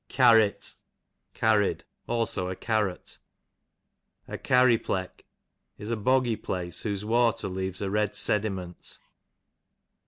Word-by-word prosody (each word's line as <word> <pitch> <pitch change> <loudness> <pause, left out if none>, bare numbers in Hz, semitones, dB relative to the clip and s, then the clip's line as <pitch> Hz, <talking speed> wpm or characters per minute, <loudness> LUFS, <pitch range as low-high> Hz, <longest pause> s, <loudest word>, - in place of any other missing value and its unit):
Carrit, 115 -5 +4 0.6
carried; 105 -2 +2 0.2
also 115 -6 -1
a 95 - -4
carrot. 105 -3 -2 1.1
A - - -6
Carry 125 -2 +4
pleck, 95 -1 -4 0.5
is 105 +2 -6
a - - +1
boggy 125 +1 +2
place 90 -2 -4
whose 105 -2 -3
water 115 -1 +2
leaves 95 0 -4
a 100 - -2
red 105 0 0
sedi 105 0 +1
ment. 90 -2 -8
105 Hz, 115 wpm, -27 LUFS, 95-115 Hz, 1.1 s, Carrit